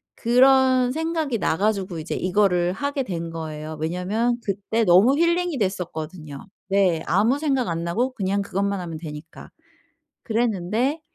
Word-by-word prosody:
그런 255 Hz, +1 st, +4 dB
생각이 320 Hz, -5 st, -2 dB
나 160 Hz, -, 0 dB
가지고 195 Hz, -4 st, -1 dB
이제 160 Hz, +1 st, -5 dB
이거를 180 Hz, -2 st, +1 dB
하게 285 Hz, +5 st, -2 dB
된 170 Hz, -7 st, -4 dB
거예요. 155 Hz, -1 st, -6 dB
왜냐면 195 Hz, +9 st, -1 dB
그때 205 Hz, +3 st, -1 dB
너무 205 Hz, +10 st, +5 dB
힐링이 340 Hz, -2 st, +1 dB
됐었거든요. 165 Hz, -, -4 dB, 0.2 s
네. 190 Hz, -5 st, +2 dB
아무 220 Hz, +10 st, +2 dB
생각 270 Hz, -, 0 dB
안 165 Hz, 0 st, -2 dB
나고 240 Hz, +10 st, -1 dB
그냥 200 Hz, -3 st, -1 dB
그것만 200 Hz, 0 st, -2 dB
하면 165 Hz, -2 st, -6 dB
되니까. 155 Hz, 0 st, -10 dB, 0.7 s
그랬는데 230 Hz, -, 0 dB
200 Hz, 305 characters per minute, -23 LUFS, 175-250 Hz, 0.7 s, 너무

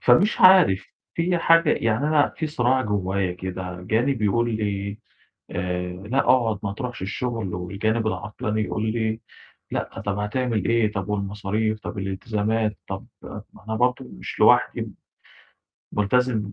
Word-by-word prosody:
فمش 170 Hz, -, +4 dB
عارف، 185 Hz, -, +7 dB, 0.3 s
فيّ 175 Hz, +1 st, +1 dB
حاجة 165 Hz, -1 st, +5 dB
يعني 115 Hz, +5 st, +1 dB
أنا 150 Hz, -2 st, +4 dB
في 160 Hz, -, -1 dB
صراع 130 Hz, -3 st, +1 dB
جوّايا 100 Hz, -3 st, -1 dB
كده، 90 Hz, 0 st, -5 dB
جانب 115 Hz, +5 st, 0 dB
يقُول 115 Hz, +2 st, +1 dB
لي 100 Hz, -1 st, -3 dB, 0.5 s
آآ: 90 Hz, 0 st, -2 dB
"لأ 105 Hz, +9 st, -3 dB
اقعد 115 Hz, -7 st, +3 dB
ما 100 Hz, -2 st, -2 dB
تروحش 125 Hz, -1 st, -5 dB
الشغل"، 110 Hz, -1 st, -3 dB
والجانب 105 Hz, +5 st, -1 dB
العطلان 105 Hz, +3 st, -2 dB
يقُول 110 Hz, +1 st, -1 dB
لي: 110 Hz, -1 st, -1 dB, 0.5 s
"لأ -, -, -4 dB
طَب 100 Hz, 0 st, -1 dB
هتعمل 110 Hz, 0 st, -1 dB
إيه؟ 115 Hz, -2 st, +2 dB
طَب 100 Hz, -1 st, -3 dB
والمصاريف، 105 Hz, +2 st, -1 dB
طَب 105 Hz, -, -6 dB
الالتزامات؟" 105 Hz, +2 st, -1 dB
طَب 95 Hz, 0 st, -5 dB, 0.2 s
ما -, -, -8 dB, 0.2 s
أنا 110 Hz, -, -1 dB
برضه 125 Hz, +2 st, +1 dB
مش 60 Hz, -, -8 dB
لوحدي، -, -, +4 dB, 1.0 s
ملتزم 105 Hz, 0 st, +1 dB
110 Hz, 140 wpm, -24 LUFS, 100-120 Hz, 1.0 s, عارف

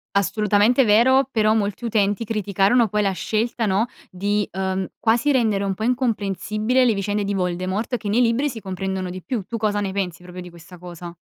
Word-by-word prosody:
assolutamente 210 Hz, +5 st, +3 dB
vero, 245 Hz, +5 st, +4 dB
però 215 Hz, -2 st, +2 dB
molti 210 Hz, +1 st, -2 dB
utenti 205 Hz, -1 st, 0 dB
criticarono 210 Hz, +2 st, +2 dB
poi 210 Hz, +1 st, 0 dB
la 195 Hz, -, +1 dB
scelta, 220 Hz, +6 st, -1 dB
no, 200 Hz, +3 st, +2 dB, 0.2 s
di, 205 Hz, +2 st, -1 dB
uhm, 190 Hz, 0 st, -2 dB
quasi 235 Hz, +5 st, +2 dB
rendere 220 Hz, -7 st, +1 dB
un 195 Hz, -1 st, -1 dB
po' 215 Hz, -, -5 dB
incomprensibile 220 Hz, 0 st, 0 dB
le 235 Hz, -, +3 dB
vicende 205 Hz, +1 st, -1 dB
di 200 Hz, 0 st, -2 dB
Voldemort, 185 Hz, +6 st, -2 dB
che 210 Hz, -, -5 dB
nei 225 Hz, +5 st, +3 dB
libri 245 Hz, +5 st, +2 dB
si 235 Hz, -4 st, -7 dB
comprendono 190 Hz, -1 st, -4 dB
di 185 Hz, +1 st, -7 dB
più. 230 Hz, +1 st, -3 dB
Tu 230 Hz, +5 st, -5 dB
cosa 210 Hz, -2 st, 0 dB
ne 200 Hz, -2 st, -2 dB
pensi 185 Hz, -3 st, -3 dB
proprio 180 Hz, 0 st, -9 dB
di 180 Hz, -, -9 dB
questa 170 Hz, +1 st, -14 dB
cosa? 175 Hz, -1 st, -9 dB
205 Hz, 190 wpm, -22 LUFS, 190-230 Hz, 0.2 s, vero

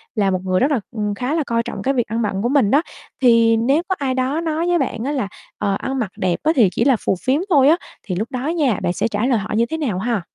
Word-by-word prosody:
là 200 Hz, -3 st, +2 dB
một 185 Hz, -, 0 dB
người 185 Hz, -1 st, +1 dB
rất 275 Hz, +4 st, +2 dB
là, 275 Hz, -, +2 dB
ừ, 235 Hz, -, -8 dB, 0.2 s
khá 250 Hz, +8 st, -2 dB
là 320 Hz, -, +1 dB
coi 230 Hz, 0 st, 0 dB
trọng -, -, -6 dB
cái 270 Hz, -, 0 dB
việc 240 Hz, -4 st, 0 dB
ăn 225 Hz, +2 st, -2 dB
bận 200 Hz, -3 st, -1 dB
của 240 Hz, -, 0 dB
mình 265 Hz, -7 st, +3 dB
đó, 285 Hz, -, +5 dB, 0.4 s
thì 230 Hz, -2 st, +5 dB
nếu 270 Hz, +8 st, +2 dB
có 375 Hz, -, 0 dB
ai 270 Hz, -2 st, -1 dB
đó 260 Hz, +5 st, -1 dB
nói 325 Hz, +1 st, -1 dB
với 350 Hz, 0 st, +3 dB
bạn 225 Hz, -, -2 dB
á 275 Hz, -, -1 dB
là 265 Hz, -8 st, -1 dB, 0.3 s
"Ờ, 200 Hz, -2 st, 0 dB
ăn 265 Hz, 0 st, -3 dB
mặc 215 Hz, -6 st, -2 dB
đẹp 180 Hz, -2 st, 0 dB
á 310 Hz, -, +3 dB
thì 225 Hz, -7 st, +5 dB
chỉ 225 Hz, -, 0 dB
là 270 Hz, 0 st, +4 dB
phù -, -, +2 dB
phiếm 270 Hz, +4 st, +2 dB
thôi" 280 Hz, -6 st, +5 dB
á 325 Hz, -, +5 dB, 0.3 s
thì 185 Hz, -, -4 dB
lúc 215 Hz, +7 st, -3 dB
đó 255 Hz, +1 st, -3 dB
nha, 300 Hz, -, +1 dB
bạn 175 Hz, -, 0 dB
sẽ -, -, 0 dB
trả 210 Hz, +1 st, -1 dB
lời 255 Hz, -2 st, +2 dB
họ 210 Hz, -, -6 dB
như 230 Hz, +2 st, +3 dB
thế 320 Hz, +7 st, -4 dB
nào 240 Hz, -13 st, -2 dB
ha? 225 Hz, 0 st, -1 dB
245 Hz, 300 wpm, -20 LUFS, 215-280 Hz, 0.4 s, đó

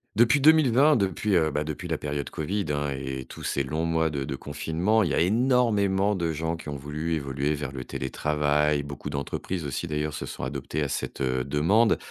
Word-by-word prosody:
Depuis 120 Hz, +5 st, +5 dB
2020, 145 Hz, -1 st, +5 dB
depuis, 100 Hz, -1 st, +1 dB
heu, 80 Hz, -2 st, +3 dB
ben, 75 Hz, +1 st, -1 dB
depuis 80 Hz, +3 st, -5 dB
la 80 Hz, -3 st, -1 dB
période 70 Hz, -1 st, -3 dB
covid 95 Hz, +6 st, -2 dB
hein, 75 Hz, -1 st, -1 dB
et 65 Hz, 0 st, -4 dB
et -, -, -9 dB
tous -, -, -11 dB
ces 70 Hz, -, -1 dB
longs 80 Hz, +5 st, -2 dB
mois 80 Hz, -1 st, +1 dB
de 70 Hz, -2 st, -3 dB
de 70 Hz, -, -4 dB
confinement, 80 Hz, +10 st, 0 dB
il 90 Hz, -, +1 dB
y -, -, -1 dB
a -, -, +2 dB
énormément 105 Hz, -2 st, +2 dB
de 85 Hz, -4 st, -1 dB
gens 80 Hz, +2 st, -2 dB
qui 80 Hz, -, -8 dB
ont 70 Hz, -, -4 dB
voulu 75 Hz, +4 st, -3 dB
évoluer 70 Hz, 0 st, -1 dB
vers 70 Hz, -3 st, -4 dB
le 65 Hz, -2 st, -6 dB
télétravail. 75 Hz, +2 st, 0 dB
Beaucoup 70 Hz, -1 st, -7 dB
d'entreprises 75 Hz, +5 st, -4 dB
aussi 70 Hz, +4 st, -3 dB
d'ailleurs 75 Hz, -1 st, -2 dB
se 70 Hz, -3 st, -5 dB
sont 65 Hz, -, -7 dB
adoptées 70 Hz, +3 st, -3 dB
à -, -, 0 dB
cette, -, -, -4 dB
heu, 65 Hz, -1 st, 0 dB
demande. 85 Hz, -, +3 dB
75 Hz, 215 wpm, -26 LUFS, 70-95 Hz, -, Depuis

